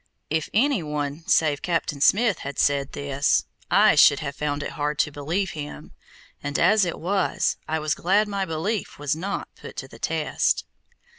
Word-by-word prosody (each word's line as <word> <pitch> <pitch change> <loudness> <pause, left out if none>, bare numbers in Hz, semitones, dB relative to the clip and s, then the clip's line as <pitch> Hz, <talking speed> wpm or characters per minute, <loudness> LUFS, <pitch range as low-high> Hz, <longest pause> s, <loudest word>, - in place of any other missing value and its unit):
If 160 -1 0
any 260 -1 +2
one 150 0 -4
save 150 -3 +3
Captain 165 -4 -1
Smith 215 +5 +4
had 140 +1 -6
said 140 -1 +1
this, 140 0 +1 0.2
I - - +6
should 145 - +6
have 140 -2 -4
found 145 -1 -2
it - - -4
hard 150 -1 -2
to 150 - +1
believe 165 +7 -2
him, 150 -1 -8 0.5
and 145 0 -2
as 210 -2 +4
it 175 - -3
was 190 +3 0
I 160 +1 0
was 155 -1 0
glad 200 +5 +2
my 200 -1 -2
belief 180 +6 -3
was 145 +1 -1
not 195 +5 -4
put - - -11
to - - -6
the - - -15
test. - - 0
155 Hz, 175 wpm, -24 LUFS, 145-190 Hz, 0.5 s, I